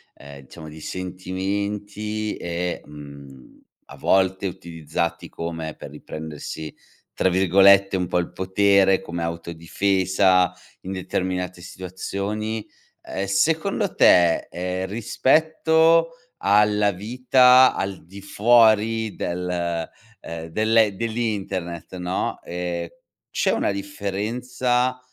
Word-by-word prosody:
ehm, 70 -1 -12
diciamo 80 +4 -12
di 75 0 -11
sentimenti 100 +4 -4
e, 85 +1 -3
mhmm, 70 -3 -13 0.2
a - - -13
volte 95 0 +1
utilizzati 85 -1 -4
come 80 -2 -5
per - - -10
riprendersi, 80 0 -8 0.4
tra 95 - +1
virgolette 95 +2 +5
un 90 -1 -1
po' 90 - 0
"il 85 - -2
potere", 95 0 +3
come 85 0 -5
autodifesa 90 +3 +1 0.3
in 95 - -7
determinate 90 -1 -3
situazioni, 100 +4 -5 0.4
ehm, 95 - -4
secondo 160 - 0
te, 85 -2 +5
ehm, 90 +1 -3
rispetto 160 +8 +3 0.3
alla 105 0 +3
vita 125 +5 +5
al 95 -4 -4
di 95 +3 -12
fuori 110 0 +3
del 85 -2 -3 0.3
ehm, 80 0 -7
dell'e 110 +3 +2
dell'internet, 100 -7 -3
no, 90 +1 -3
ehm, 85 -1 -4 0.5
c'è - - +2
una - - 0
differenza 120 +6 -2
95 Hz, 100 wpm, -23 LUFS, 85-105 Hz, 0.5 s, virgolette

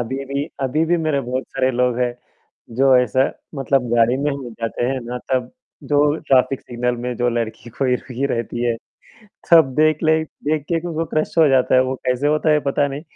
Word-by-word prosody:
अभी 130 +3 -4
भी 140 +1 -2 0.2
अभी 145 +5 +1
भी 175 +2 +2
मेरे 155 -4 0
बहुत 130 +1 -3
सारे 130 -1 0
लोग 125 -1 0
हैं। 125 -1 0 0.6
जो 135 0 +5
ऐसा 125 +1 +2 0.3
मतलब 135 -2 0
गाड़ी 120 +2 +3
में 145 +2 0
ही 140 - -3
हम 140 - -8
लोग 120 - -8
जाते 115 +1 -2
हैं 130 +1 -1
ना 125 +1 -5
तब, 130 -1 0 0.3
जो 145 0 +2
ट्रैफिक 130 0 +3
सिग्नल 125 0 -2
में 125 0 -3
जो 120 +1 +1
लड़की 115 0 -4
कोई 130 -2 +2
रुकी 130 +1 -4
रहती 120 +1 -3
है। 120 -1 0 0.7
सब 160 -6 +6
देख 155 0 +3
लें, 160 0 +3 0.2
देख 150 0 0
के 170 -1 0
भी 175 - -7
उनको 165 0 -2
क्रश 155 - -1
हो 160 - +7
जाता 130 -2 +3
है, 130 - +6
वो 130 +1 -2
कैसे 125 +3 +1
होता 155 +1 +2
है 150 0 +4
पता 140 +1 +2
नहीं। 140 +2 -6
130 Hz, 220 wpm, -20 LUFS, 125-145 Hz, 0.7 s, हो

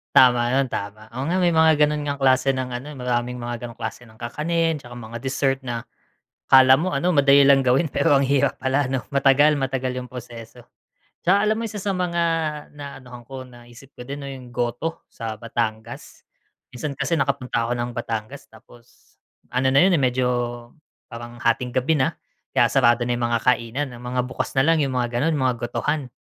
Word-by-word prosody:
Tama 125 -2 +6
yun 135 -1 +1
tama. 105 +1 -6
Oo 130 +4 -5
nga 180 +4 0
may 175 - +4
mga 160 -1 +5
ganun 150 0 +1
ngang 140 -1 -3
klase 135 0 +3
ng 130 -1 -3
ano, 125 +5 -6
maraming 125 -2 -2
mga 120 0 -5
ganong 120 - -8
klase 120 - -5
ng 110 - -18
kakanin, 165 +6 -1
'tsaka 120 -4 -12
mga 115 -1 -8
dessert 135 +2 0
na 120 -2 -3 0.6
akala 130 0 +7
mo 180 +4 -2
ano, 145 +6 +1
madali 140 -4 +5
lang 135 -1 +5
gawin, 130 +6 +3
pero 140 +1 +2
ang 140 - +4
hirap 140 0 +2
pala 135 +2 +1
'no, 130 0 -2
matagal 140 +2 +4
matagal 130 -2 -2
yung 125 - -4
proseso. 120 -1 -10 0.6
'Tsaka 195 +4 +3
alam 215 +1 +1
mo 230 - -3
isa 210 - -8
sa 200 0 -2
mga 180 -2 -1 0.5
naanuhan 135 -4 -10
ko 135 -1 -7
naisip 120 +2 -16
ko - - -16
din 140 - -4
'no, 140 - -6
yung 130 -2 -10
goto 120 +7 -3
sa 115 -2 -5
Batangas. 110 0 -5 0.5
Minsan 140 +3 -5
kasi 165 +1 0
nakapunta 125 -4 -1
ako 120 - -1
ng 120 0 -3
Batangas 115 +2 -5
tapos 115 +2 -20 0.4
ano 130 +1 +1
na 130 - +2
yun, 190 - +4
eh, 165 - +3
medyo 130 -1 +1 0.9
parang 120 0 -8
hating 120 +1 0
gabi 140 +4 +2
na 130 - +1 0.4
kaya - - +4
sarado 120 -3 +4
na 120 - -1
yung 120 -1 -1
mga 115 -1 -1
kainan, 125 +3 0
ang 120 - -11
mga 125 0 -2
bukas 130 +1 -5
na 135 - +4
lang 165 +1 +3
yung 135 -3 -1
mga 120 -1 -1
ganun 155 +3 +1
mga 130 -3 +1
gotohan. 145 +2 -2
130 Hz, 195 wpm, -23 LUFS, 120-145 Hz, 0.9 s, akala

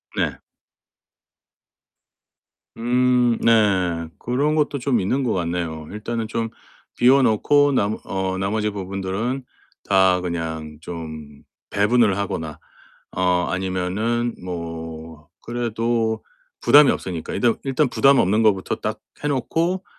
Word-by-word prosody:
네. - - -1 2.4
음 125 0 +2
네. 95 -7 +2
그런 140 +5 0
것도 145 -2 0
좀 125 -2 +1
있는 125 +8 0
것 120 - 0
같네요. 85 -3 -3
'일단은 110 +2 -4
좀 115 0 -2 0.5
비워 135 +3 +5
놓고 145 +6 +3
남 105 -3 +1
어 95 -1 -2
나머지 105 +3 -1
부분들은 100 +6 -3 0.5
다 95 -2 +4
그냥 80 -3 -4
좀 80 -4 -8 0.3
배분을 105 -1 +3
하거나 80 -6 -4 0.6
어 90 -1 +2
아니면은 95 +6 -1
뭐 80 -3 -7
그래도 115 -1 -1 0.4
부담이 145 -1 +7
없으니까 85 -4 -4
일단 120 -2 +2
일단 135 +1 +1
부담 135 +2 +4
없는 105 +4 +3
것부터 100 -4 +2
딱 - - -4 0.2
해 145 - 0
놓고 165 +7 -1
105 Hz, 215 characters per minute, -22 LUFS, 90-120 Hz, 2.4 s, 부담이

